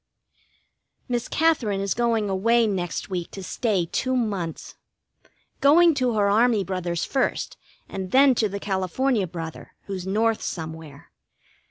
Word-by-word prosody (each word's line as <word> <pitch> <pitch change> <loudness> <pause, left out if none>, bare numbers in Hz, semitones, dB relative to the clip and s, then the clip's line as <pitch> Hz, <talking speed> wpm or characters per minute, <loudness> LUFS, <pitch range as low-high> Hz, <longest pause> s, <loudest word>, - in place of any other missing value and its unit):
Miss 240 -2 -2
Katherine 275 -11 +1
is 195 0 0
going 230 -3 +1
away 230 +5 +2
next 190 -2 -3
week 175 -2 -3
to 195 - -7
stay 195 -2 0
two 260 +9 -1
months. 200 -9 -3 0.9
Going 330 +4 +6
to 255 -4 0
her 205 -2 +2
army 220 0 +3
brother's 180 -2 -2
first, 270 - -1 0.3
and 190 -1 -5
then 270 +3 +6
to 220 -3 +1
the 200 +1 -5
California 200 +4 0
brother, 165 -1 -8
who's 190 -2 -5
North 220 +3 +1
somewhere. 160 -3 -7
205 Hz, 135 wpm, -24 LUFS, 185-240 Hz, 0.9 s, Going